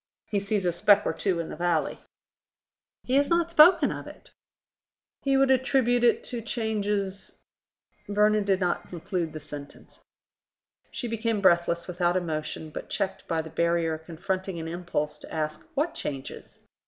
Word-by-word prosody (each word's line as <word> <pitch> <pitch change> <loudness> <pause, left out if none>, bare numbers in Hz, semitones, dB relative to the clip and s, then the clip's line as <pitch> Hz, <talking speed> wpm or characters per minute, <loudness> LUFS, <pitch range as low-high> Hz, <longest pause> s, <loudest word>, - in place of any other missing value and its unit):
He 205 - +2
sees 200 -1 -1
a 175 - +3
speck 205 +4 +4
or - - 0
two 185 -4 0
in 165 - -4
the - - -6
valley." 175 -2 0 1.0
"He 255 - -3
has 285 0 +3
not 340 0 +2
spoken 340 +3 +7
of - - -6
it." - - -13 0.9
"He 275 -1 +2
would 270 0 +4
attribute 255 -2 +3
it 235 - +4
to 240 -2 -4
changes.. 205 -4 -2 0.3
." - - -41
Vernon 210 +1 +3
did 195 -2 +2
not 180 -2 -1
conclude 175 -1 -3
the 155 - -7
sentence. 145 -1 -11 0.9
She 245 - -4
became 230 -1 -1
breathless, 170 -2 +3
without 180 0 +1
emotion, 155 -2 -4
but - - -7
checked 195 -2 -2
by 165 -2 0
the 160 - -10
barrier 170 -1 +1
confronting 180 +3 -4
an 160 - -5
impulse 165 -3 -3
to - - -12
ask, 155 -1 -3
what 310 +4 0
changes? 135 - -6
190 Hz, 160 wpm, -27 LUFS, 170-225 Hz, 1.0 s, spoken